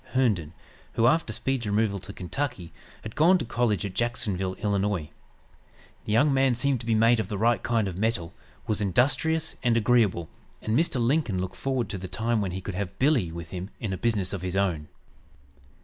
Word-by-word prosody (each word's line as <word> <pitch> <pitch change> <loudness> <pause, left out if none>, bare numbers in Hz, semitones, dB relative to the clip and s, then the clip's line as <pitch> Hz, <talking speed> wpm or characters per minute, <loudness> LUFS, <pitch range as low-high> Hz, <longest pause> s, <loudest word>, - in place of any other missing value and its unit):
Herndon, 95 - +1 0.4
who, 115 - +2
after 150 -1 +3
Speed's 125 +1 -1
removal 105 -1 +1
to 95 +2 -9
Kentucky, 100 -1 -4 0.3
had 110 - -8
gone 175 +5 +5
to - - -4
college 110 -5 0
at 100 - -5
Jacksonville, 100 -6 -1
Ill. 105 - -1
The 100 -6 -1 1.0
young 120 +7 +3
man 135 -2 +3
seemed 135 +1 +1
to 115 - -9
be 115 - +3
made 115 +2 +4
of 110 - -1
the 105 - -4
right 115 0 +2
kind 115 -3 +1
of 90 -1 -5
metal, 100 -6 -1 0.3
was 105 -1 0
industrious, 140 - +1
and 120 -2 +2
agreeable, 105 -7 +2 0.3
and 110 - -1
Mr. 155 -3 +2
Lincoln 120 - +1
looked 95 0 -4
forward 130 -4 -1
to 100 -2 -4
the 95 - -6
time 110 +4 0
when 100 - -1
he 95 +1 -5
could 100 - -5
have 100 0 -4
"Billy" 130 - +2
with 85 -1 -8
him 95 +1 -5
in 105 -5 -3
a - - -1
business 105 -3 -1
of 95 - -4
his 90 0 -3
own. 90 -6 0
110 Hz, 195 wpm, -26 LUFS, 95-120 Hz, 1.0 s, gone